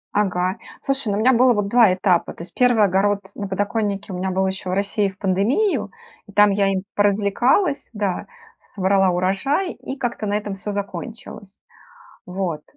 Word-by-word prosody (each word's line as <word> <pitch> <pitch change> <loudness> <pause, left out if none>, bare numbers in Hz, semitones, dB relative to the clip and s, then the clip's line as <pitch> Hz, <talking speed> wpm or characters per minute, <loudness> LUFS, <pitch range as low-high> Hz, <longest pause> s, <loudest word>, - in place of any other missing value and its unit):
Ага. 185 -1 0 0.2
Слушай, 270 -4 -2
ну 200 - 0
у - - -1
меня 260 +3 +5
было 250 +1 +5
вот 205 -2 -1
2 235 -5 +5
этапа. 185 -2 +1
То 170 - -9
есть - - -11
1 245 -4 +3
огород 200 +1 +2
на 200 - -4
подоконнике 205 0 -2
у - - -4
меня 190 +1 -2
был 190 +1 0
еще 190 -1 -3
в - - -1
России 200 +1 0
в 190 - -15
пандемию, 210 - +1 0.4
и 200 - -13
там 205 0 +5
я 195 0 +2
им 190 0 -2
поразвлекалась, 210 - +2
да, 200 -4 -2 0.3
с - - -25
собрала 195 -1 +3
урожай 195 - 0
и 265 - -8
как-то 235 -4 -3
на 205 - -1
этом 210 -1 -3
всё 195 +2 -7
закончилось. 200 0 -7 0.6
Вот. 180 -4 -3
200 Hz, 185 wpm, -21 LUFS, 190-225 Hz, 0.6 s, меня